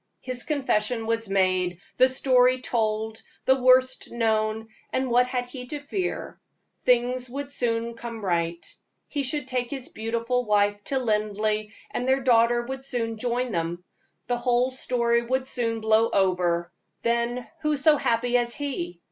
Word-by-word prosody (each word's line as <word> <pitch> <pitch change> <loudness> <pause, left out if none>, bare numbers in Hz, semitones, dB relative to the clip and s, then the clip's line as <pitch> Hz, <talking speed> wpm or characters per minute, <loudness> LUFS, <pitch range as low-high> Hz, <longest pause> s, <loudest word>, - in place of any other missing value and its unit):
His 255 -1 -4
confession 240 -6 0
was 225 -1 -1
made, 185 -2 +1 0.2
the 255 +1 +6
story 255 -1 +3
told, 220 -2 -1 0.2
the 265 0 +3
worst 255 +1 +4
known, 220 -1 0 0.2
and 260 -1 -1
what 245 +1 +4
had 250 -1 -2
he 250 0 -9
to 295 +3 -5
fear? 360 +6 -4 0.4
Things 250 0 +2
would 280 +2 -5
soon 235 -3 -1
come 230 -2 -7
right. 170 -1 -1 0.4
He 290 - -2
should 275 0 -2
take 250 -2 -1
his 270 -3 -6
beautiful 230 +3 -1
wife 205 -1 +2
to 275 - -1
Linleigh, 215 -2 0 0.3
and 250 - -2
their 265 +1 +3
daughter 240 -1 +4
would 265 +2 -6
soon 230 -4 -3
join 245 +1 -1
them; 170 -1 -2 0.4
the 245 - 0
whole 245 +1 +2
story 235 -2 +1
would 260 +2 -1
soon 230 -3 -2
blow 220 +1 +3
over, 180 -3 +1 0.3
then 235 +1 0
who 300 -1 +1
so 295 +2 +5
happy 240 0 +1
as 240 -1 0
he? 180 -12 -4
240 Hz, 155 wpm, -26 LUFS, 220-255 Hz, 0.4 s, the